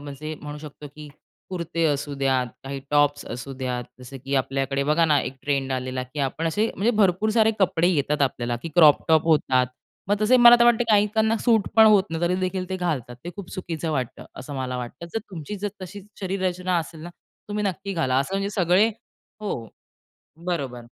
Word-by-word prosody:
म्हणजे 145 +2 -7
म्हणू 150 0 -7
शकतो, 150 0 -10
की 150 -1 -9 0.4
कुर्ते 170 -2 -2
असू 145 -1 -1
द्या, 130 -1 +2 0.2
काही 135 0 -5
टॉप्स 145 0 +2
असू 130 +3 -7
द्या 125 -1 -2 0.2
जसं 125 +2 -9
की 140 +1 -2
आपल्याकडे 135 +1 -1
बघा 155 +3 +3
ना, 150 -3 +3
एक 130 - -5
ट्रेंड 140 -2 -1
आलेला 130 0 -3
की 130 +3 -6
आपण 165 +5 -4
असे, 210 +7 +1
म्हणजे 220 +5 +2
भरपूर 195 +3 +2
सारे 220 0 +4
कपडे 175 -3 +2
येतात 150 -3 +1
आपल्याला, 120 -3 -1
की 165 - -4
क्रॉप 155 -4 +6
टॉप 160 -1 +5
होतात. 130 -5 +3 0.4
मग 205 - +3
तसे 230 +4 +5
मला 240 -1 +9
तर - - +7
वाटते 240 0 +4
काहीकांना 215 +2 +3
सूट 225 -4 +3
पण 220 - +8
होत 205 -3 +6
नाही 165 +1 -3
तरी 175 +1 +2
देखील 185 0 -2
ते 190 - -2
घालतात, 145 -9 -3
ते 175 - -5
खूप 200 -3 -8
चुकीचं 165 -3 -4
वाटतं, 130 -5 -3
असं 140 +2 -8
मला 130 -1 -3
वाटतं. 125 +7 -7
जर 225 - 0
तुमची 175 +3 -6
जर 205 +1 -2
तशी 195 +2 -8 0.2
शरीररचना 185 -1 -1
असेल 165 -1 -7
ना, 175 - -8 0.4
तुम्ही 210 0 -2
नक्की 195 0 -3
घाला. 130 -8 0
असं 160 +8 -2
म्हणजे 195 +1 -1
सगळे 190 +2 +3 0.5
हो. 120 - -4 0.8
बरोबर. 135 -9 -3
165 Hz, 195 wpm, -24 LUFS, 140-195 Hz, 0.8 s, मला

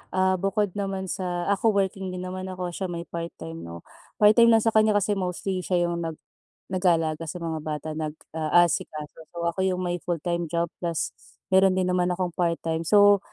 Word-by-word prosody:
ah, 185 -1 +2
bukod 195 0 0
naman 195 -2 -3
sa 175 -2 -3
ako 210 +1 +2
working 195 -1 0
din 180 0 -5
naman 185 +1 -5
ako, 180 -1 -4
siya 190 +2 -3
may 170 -1 -4
part-time, 150 - -7
no? 85 0 -9 0.3
Part-time 215 +3 +6
lang 225 -1 +5
sa 225 - +3
kanya 215 -1 +4
kasi 205 +1 +2
mostly 185 +1 -2
siya 175 -1 +1
'yong 170 - -2
nag 160 - -5 0.6
nag-aalaga 165 -4 +1
sa 155 - -5
mga 160 -1 -2
bata, 155 0 -4
nag-aasikaso. 155 0 -1
So, 170 - -3
ako 170 +2 -1
'yung 185 0 -1
may 175 0 -1
full-time 170 0 -2
job 170 +1 -1
plus 170 -2 -2 0.4
meron 190 0 +5
din 185 -1 +1
naman 180 -1 +2
akong 180 -1 -2
part-time. 165 -2 0
So, 205 -1 +6
180 Hz, 180 wpm, -26 LUFS, 165-190 Hz, 0.6 s, Part-time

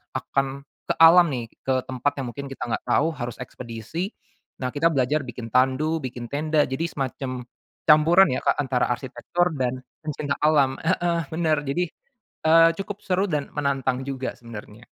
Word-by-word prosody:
akan 135 0 -1 0.3
ke - - +2
alam 170 +1 +9
nih, 115 -2 -4 0.2
ke 130 -1 +1
tempat 130 +2 0
yang 125 - -4
mungkin 140 0 -6
kita - - -6
enggak 110 - -2
tahu 140 +6 +3
harus 120 -4 -5
ekspedisi. 125 - -6 0.5
Nah 125 - 0
kita 155 +3 +2
belajar 140 +3 +1
bikin 120 -1 -7
tandu, 135 +5 +2
bikin 120 -2 -6
tenda. 150 +1 +2
Jadi 130 +6 -2
semacam 130 -2 -4 0.4
campuran 165 +5 +7
ya, - - 0
Kak, - - +3
antara 130 -2 +1
arsitektur 160 +8 -1
dan 130 0 -1 0.2
pencinta 150 -2 -3
alam. 145 -3 +4
Heeh, 170 -1 +1
bener. 160 -2 +2
Jadi, 175 +6 0 0.6
eee, 165 +1 +7
cukup 205 +1 -5
seru 190 +1 +1
dan 150 -3 -2
menantang 135 -3 -1
juga 135 -1 -3
sebenarnya. 115 -1 -11
140 Hz, 160 wpm, -24 LUFS, 125-160 Hz, 0.6 s, alam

